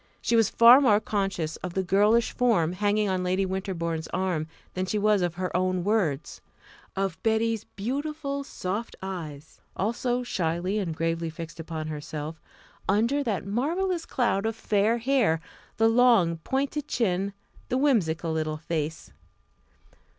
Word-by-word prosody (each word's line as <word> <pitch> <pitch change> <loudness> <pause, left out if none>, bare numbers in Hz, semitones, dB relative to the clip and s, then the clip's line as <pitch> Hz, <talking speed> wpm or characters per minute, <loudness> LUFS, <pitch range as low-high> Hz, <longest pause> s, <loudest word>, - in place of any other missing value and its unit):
She 235 - 0
was 225 -2 +4
far 240 +4 +8
more 210 -7 +5
conscious 195 -7 -2
of 180 -1 -6
the 190 - +1
girlish 210 +5 +3
form 205 -10 +2
hanging 205 +2 +1
on 185 -1 0
Lady 185 +2 +1
Winterbourne's 170 -4 -3
arm 180 -5 -1 0.3
than 185 0 -2
she 210 - 0
was 210 -1 +3
of 175 -1 -1
her 180 -1 -3
own 185 0 +1
words, 180 -8 0 0.5
of 195 -3 -2
"Betty's" 225 0 +1
beautiful 280 +5 -3
soft 210 -3 -4
eyes 160 -6 -7 0.2
also 240 +5 0
shyly 180 -1 -1
and 170 -6 -3
gravely 165 0 -1
fixed 165 0 -8
upon 160 -1 -5
herself 155 +1 -6 0.5
under 230 +8 +2
that 205 - -2
marvellous 330 - -1
cloud 220 -5 +1
of 225 - -2
fair 220 +1 +1
hair; 235 -9 +2 0.4
the 225 - +4
long, 225 -8 +4
pointed 275 - -2
chin; 195 -3 0 0.4
the 255 - +1
whimsical 175 - +1
little 155 -1 -1
face. 160 -1 -4
195 Hz, 145 wpm, -27 LUFS, 170-230 Hz, 0.5 s, far